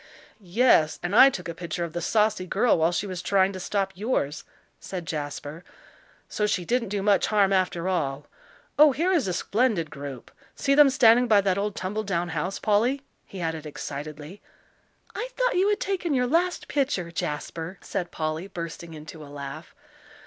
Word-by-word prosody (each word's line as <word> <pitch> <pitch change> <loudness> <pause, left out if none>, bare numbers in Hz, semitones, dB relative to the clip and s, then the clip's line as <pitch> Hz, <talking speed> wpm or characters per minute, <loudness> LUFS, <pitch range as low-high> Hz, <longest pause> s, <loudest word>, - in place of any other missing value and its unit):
"Yes, 185 -4 +3
and 180 +3 -1
I 270 - +9
took 185 -9 -6
a 170 - -4
picture 170 +1 -4
of 170 -2 -5
the 175 - -3
saucy 210 -1 +1
girl 215 +6 +3
while 165 +2 +3
she 175 +4 -1
was 185 -3 -5
trying 195 0 +2
to 185 - -6
stop 195 +1 -1
yours," 190 - -2 0.4
said 180 -3 -6
Jasper. 150 +1 -5 0.6
"So 210 - -1
she 185 -4 -1
didn't 240 -1 0
do 200 -1 -2
much 200 -2 +3
harm, 200 -2 +3
after 185 -2 0
all. 145 -6 -1 0.5
Oh, 300 -2 +8
here 340 +8 +1
is 325 - +2
a - - 0
splendid 200 -5 0
group! 140 -3 -8 0.2
See 275 - +1
them 290 0 +7
standing 245 -3 +5
by 210 -3 +5
that 195 -1 +1
old 205 0 -2
tumble 205 +4 -3
down 175 -4 -2
house, 175 +4 -2
Polly," 235 +6 +1 0.2
he 190 - -8
added 160 -2 -3
excitedly. 150 +5 -7 0.7
"I - - -4
thought - - +1
you 380 +3 +3
had 415 - +1
taken 360 -6 -1
your 250 -1 +2
last 345 +7 0
picture, 260 -12 -1
Jasper," 165 +2 -4
said 180 -3 -4
Polly, 155 +2 -3
bursting 170 -2 -7
into 155 +1 -10
a 145 - -12
laugh. 145 - -8
190 Hz, 180 wpm, -26 LUFS, 165-230 Hz, 0.7 s, I